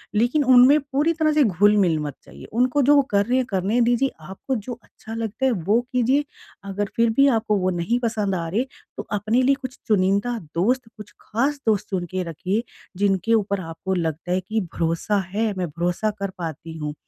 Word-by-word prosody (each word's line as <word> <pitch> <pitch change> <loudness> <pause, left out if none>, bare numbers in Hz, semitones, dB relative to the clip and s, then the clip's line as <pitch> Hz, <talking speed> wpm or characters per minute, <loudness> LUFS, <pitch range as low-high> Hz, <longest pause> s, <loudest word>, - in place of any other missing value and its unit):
लेकिन 240 +7 +2
उनमें 260 +4 +7
पूरी 285 +4 0
तरह 310 -1 +1
से 300 -2 +4
घुल-मिल 200 -4 +3
मत 145 -2 -4
जाइये। - - -13
उनको 255 +3 +3
जो 290 +3 +5
वो 280 - +6
कर 200 0 +3
रहे 250 +2 +1
हैं 255 - +1
करने 200 +5 0
दीजिए, 240 +3 +2
आपको 195 - -5
जो 240 +3 -5
अच्छा 220 - -12
लगता 225 +3 -3
है 265 - +3
वो 205 +2 +1
कीजिए 255 +4 +2 0.5
अगर 205 +1 -2
फिर 230 0 +4
भी 275 - +6
आपको 215 -1 0
वो 185 0 +1
नहीं 235 +9 0
पसंद 210 -4 0
आ 165 -1 -3
रहे, 225 +8 0 0.3
तो - - -4 0.2
अपने 220 +5 +1
लिए 275 +1 +4
कुछ 255 -1 -7
चुनिंदा 200 +3 +1 0.2
दोस्त, 240 +7 +1
कुछ 210 -1 -11
खास 275 +6 -1
दोस्त 210 -3 +1
चुन 180 -3 -2
के 185 -1 -2
रखिए, 190 +8 -2 0.3
जिनके 200 +2 +1
ऊपर 200 -2 0
आपको 165 +3 -4
लगता 165 +1 -3
है 185 - +1
कि 215 +4 -2
भरोसा 170 +5 0 0.2
है, 220 -1 +1
मैं 180 -2 -1
भरोसा 175 +7 -1
कर 200 -1 -2
पाती 160 -1 -6
हूँ, 150 -1 -4
210 Hz, 200 wpm, -23 LUFS, 185-245 Hz, 0.5 s, उनमें